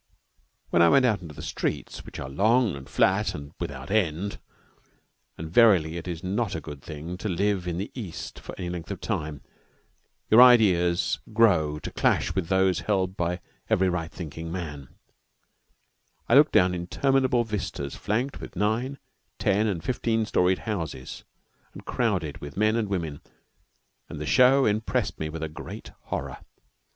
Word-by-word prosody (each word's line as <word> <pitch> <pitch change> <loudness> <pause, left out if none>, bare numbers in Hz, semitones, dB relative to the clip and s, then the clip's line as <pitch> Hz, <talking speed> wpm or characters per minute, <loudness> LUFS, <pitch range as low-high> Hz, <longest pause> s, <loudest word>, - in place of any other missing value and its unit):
Then 85 - +4
I 85 - +7
went 135 +5 +5
out 110 -5 +2
into 80 -4 -10
the - - -8
streets, - - -3
which - - -8
are 70 - -5
long 110 - +2
and 70 -1 -10
flat 100 +3 +2
and 70 -1 -8
without 65 -1 -6
end. 100 -1 0 1.0
And 80 - -6
verily 90 -9 +5
it 85 +1 -6
is 85 -1 -5
not 100 +2 -1
a - - -2
good 75 -2 -9
thing 80 +4 -7
to 105 - -3
live 95 0 0
in 85 -1 -2
the 100 +3 -4
East 100 -10 -7
for - - -9
any 90 - -4
length 85 -2 -6
of - - -5
time. 75 -2 -4 0.8
Your 110 +3 +7
ideas 95 -9 +5
grow 90 -10 +3
to 75 - -7
clash - - +1
with 95 -4 -1
those 95 -2 +2
held 95 +1 0
by 90 0 -2 0.3
every 95 0 +3
right 85 -1 -3
thinking 80 -3 -7
man. 75 -7 -6 1.4
I - - +1
looked 145 +3 +6
down 90 -4 +4
interminable 125 +8 +1
vistas 100 -10 -4
flanked 120 +7 -2
with - - -9
nine, 110 +8 0 0.4
ten, 105 +3 +2
and 90 -6 -2
fifteen 115 -3 0
storied 90 -2 +2
houses, 80 - -5 0.5
and - - -11
crowded - - -1
with 70 +4 -9
men 110 +1 +3
and 110 -3 -1
women, 80 -7 -3 0.9
and - - -7
the 75 - -4
show 130 - +5
impressed 110 +1 0
me 80 - -2
with 80 +1 -6
a - - -1
great 80 +1 -9
horror. - - -4
90 Hz, 165 wpm, -26 LUFS, 80-110 Hz, 1.4 s, I